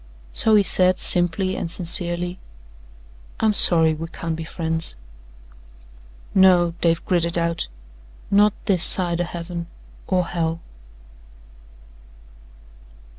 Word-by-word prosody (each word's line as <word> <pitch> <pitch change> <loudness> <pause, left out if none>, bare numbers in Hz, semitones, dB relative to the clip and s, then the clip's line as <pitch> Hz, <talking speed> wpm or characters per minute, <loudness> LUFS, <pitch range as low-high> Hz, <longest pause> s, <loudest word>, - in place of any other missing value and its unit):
So 220 -1 +4
he 205 - +4
said 185 -1 +2
simply 180 +2 0
and 165 - -5
sincerely: 175 0 -1 1.0
"I'm 220 -1 +1
sorry 165 -5 +5
we 160 +1 -7
can't 165 -1 -6
be 165 - -7
friends." 160 - -3 1.4
"No," 180 -3 +4
Dave 165 -1 0
gritted 175 -3 0
out, 170 - -2 0.6
"not 205 +1 +3
this 190 -5 +1
side 175 -2 +5
o' - - -2
Heaven 170 0 -7 0.4
or 180 -2 0
Hell." 165 -1 -3
175 Hz, 105 wpm, -21 LUFS, 165-185 Hz, 1.4 s, sorry